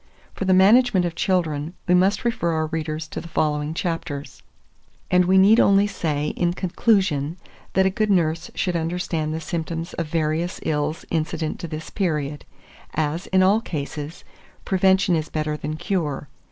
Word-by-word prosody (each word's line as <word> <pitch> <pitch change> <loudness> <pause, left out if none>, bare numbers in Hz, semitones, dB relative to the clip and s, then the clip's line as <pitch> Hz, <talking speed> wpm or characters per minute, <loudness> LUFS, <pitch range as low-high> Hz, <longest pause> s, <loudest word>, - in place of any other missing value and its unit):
For 195 - -4
the 190 - +4
management 205 0 +5
of 170 - -2
children, 165 -3 -1
we 180 - +4
must 190 +5 +3
refer 230 -8 0
our 160 0 0
readers 155 0 -4
to - - -5
the 170 - -10
following 150 -1 -1
chapters; 165 -5 -4 0.7
and 180 0 +5
we 190 +2 +4
need 205 +4 +6
only 200 0 +5
say, 150 -7 -2
in 175 -1 0
conclusion, 180 -5 +1 0.4
that 190 0 +3
a 190 - +3
good 215 +1 0
nurse 165 -3 +1
should 180 -2 -1
understand 165 -1 -2
the 160 - -2
symptoms 165 +1 -4
of 170 - -3
various 160 +2 -1
ills 150 +1 -1
incident 160 -1 -2
to 170 - -5
this 155 0 -7
period, 150 -7 -2 0.5
as, 155 +3 -1
in 190 0 +3
all 200 +4 +4
cases, 150 -3 -6 0.4
prevention 190 -1 +3
is 155 -1 -2
better 155 -1 -2
than 150 +1 -4
cure. 160 -6 -2
170 Hz, 165 wpm, -23 LUFS, 155-190 Hz, 0.7 s, need